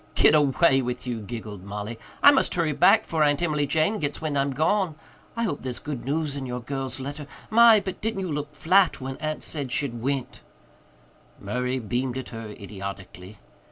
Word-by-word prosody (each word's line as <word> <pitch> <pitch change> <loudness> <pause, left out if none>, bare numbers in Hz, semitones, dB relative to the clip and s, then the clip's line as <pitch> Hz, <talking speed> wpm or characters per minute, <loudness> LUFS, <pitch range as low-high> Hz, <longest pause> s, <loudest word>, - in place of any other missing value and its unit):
"Git - - +6
away 145 -1 +4
with 125 0 -4
you," 120 -3 -3
giggled 105 -3 -7
Mollie. 105 +3 -6 0.2
"I 285 - +10
must 275 - +1
hurry 165 -3 +1
back 145 - +5
'fore 160 -1 -1
Aunt 145 -1 +3
Emily 150 -3 +1
Jane 160 +9 +1
gits 145 -2 -2
wind 155 -2 -3
I'm 140 0 +1
gone. 160 +5 +1 0.4
I 230 - -1
hope 185 -10 -2
there's 125 -2 -4
good 145 -5 -6
news 150 +1 -1
in 135 -2 -5
your 125 0 -3
girl's 135 +1 -4
letter. 140 +2 -6 0.2
My, 230 -1 +7
but 190 -2 -6
didn't 220 -2 -2
you 185 -3 -3
look 150 0 -4
flat 185 +1 +3
when 130 0 -5
Aunt 155 0 -3
said 140 -5 -3
she'd 125 -4 -2
went!" 135 0 -3 1.0
Murray 125 +5 -2
beamed 125 +2 -2
at 130 - -6
her 115 -2 -7
idiotically. 100 -1 -8
140 Hz, 190 wpm, -25 LUFS, 120-155 Hz, 1.0 s, I